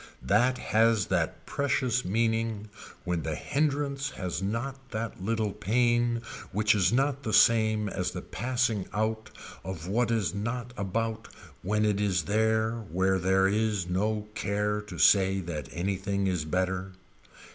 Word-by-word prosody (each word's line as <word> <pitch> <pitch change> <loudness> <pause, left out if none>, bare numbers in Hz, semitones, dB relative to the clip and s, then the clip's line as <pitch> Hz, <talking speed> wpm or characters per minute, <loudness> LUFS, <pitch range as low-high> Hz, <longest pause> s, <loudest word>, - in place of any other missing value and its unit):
That 125 +5 +3
has 110 -3 +2
that - - -1
precious 130 -3 0
meaning 110 +1 0 0.3
when 90 -3 -1
the 80 -1 -3
hindrance 140 - -1
has 90 -2 -3
not 125 +6 -4
that 110 -4 -5
little 110 0 0
pain 120 +2 +1 0.3
which 105 +2 +3
is 95 -3 +3
not 135 +2 +1
the 110 -6 -3
same 110 -2 +4
as 95 -2 -2
the 90 0 -6
passing 120 -4 -1
out 110 0 -1 0.3
of 90 -3 -6
what 115 +4 +1
is 110 -8 0
not 120 +4 -4
about 110 +3 -2 0.3
when 105 +3 +1
it 105 -1 +1
is 95 -6 +1
there 110 +3 +1
where 95 +2 +2
there 95 +1 +3
is 105 -2 0
no 105 +4 -1
care 105 +1 -1
to 105 - -9
say 95 -1 +5
that 80 -7 -5
anything 95 +2 -1
is 90 -5 0
better. 95 +2 -1
105 Hz, 145 wpm, -28 LUFS, 95-115 Hz, 0.3 s, say